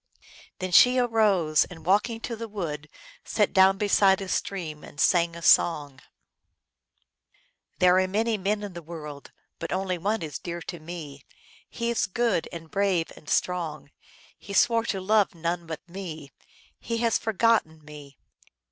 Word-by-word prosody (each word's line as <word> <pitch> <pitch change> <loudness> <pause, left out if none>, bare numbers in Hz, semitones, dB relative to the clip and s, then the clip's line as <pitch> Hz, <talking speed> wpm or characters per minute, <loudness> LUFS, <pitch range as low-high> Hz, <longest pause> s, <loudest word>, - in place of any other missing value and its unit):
Then 185 -1 -4
she 250 +7 +7
arose, 210 -10 +3
and, 160 -3 -13
walking 210 +5 +1
to 230 - -4
the 230 +1 -6
wood, 155 -8 -5 0.3
sat 210 -2 0
down 190 0 +5
beside 200 -2 +3
a 195 - -6
stream 165 -6 -3
and 145 - -13
sang 170 +1 +3
a 170 - -9
song: 145 -6 +3 0.8
" - - -43
There 180 0 +5
are 185 - +1
many 220 +4 0
men 205 +1 -1
in 200 -2 -6
the 170 - -8
world, 150 -3 -9 0.3
But 165 - -5
only 185 -1 -1
one 205 +3 -1
is 150 -3 -5
dear 170 -1 -6
to 175 - -7
me. 155 -4 -9 0.5
He 235 0 -2
is 230 - 0
good 215 -3 0
and 165 -2 -9
brave 195 -4 0
and 150 - -13
strong. 155 -6 -1 0.5
He 200 - -9
swore 230 +3 +3
to 195 - -2
love 205 0 +2
none 170 +1 -3
but 160 +1 -7
me; 165 -6 -8 0.5
He 230 - -3
has 230 0 +1
forgotten 220 -8 +1
me. 145 -2 -12
180 Hz, 160 wpm, -26 LUFS, 160-205 Hz, 0.8 s, she